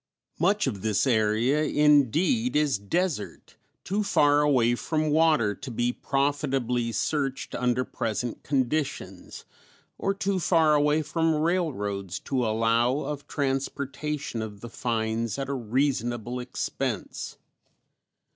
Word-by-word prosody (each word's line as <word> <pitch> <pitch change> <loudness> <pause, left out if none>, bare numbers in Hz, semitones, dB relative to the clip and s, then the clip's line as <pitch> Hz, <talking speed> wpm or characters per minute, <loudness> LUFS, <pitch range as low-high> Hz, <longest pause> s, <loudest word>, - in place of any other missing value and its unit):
Much 200 +5 +2
of 105 -8 -3
this 105 -2 +1
area 115 +4 +2
indeed 150 - +3
is 150 -7 +2
desert, 150 - -3 0.3
too 205 +3 -1
far 145 -7 +4
away 130 -5 +3
from 155 +4 -1
water 155 -9 +3
to 135 - -9
be 120 +1 0
profitably 135 -4 0
searched 135 +4 -2
under 125 +1 0
present 115 0 -3
conditions, 135 - -2 0.5
or 195 - +1
too 195 -1 -1
far 160 -3 +3
away 150 +1 +3
from 160 +1 +1
railroads 105 - -1
to 130 -2 -1
allow 115 +4 +2
of 145 -1 -5
transportation 140 -1 -3
of 105 -2 -7
the 120 - -7
finds 115 -1 -2
at 135 -1 -3
a - - -1
reasonable 120 -1 -1
expense. 125 0 -4
135 Hz, 120 wpm, -26 LUFS, 115-150 Hz, 0.5 s, far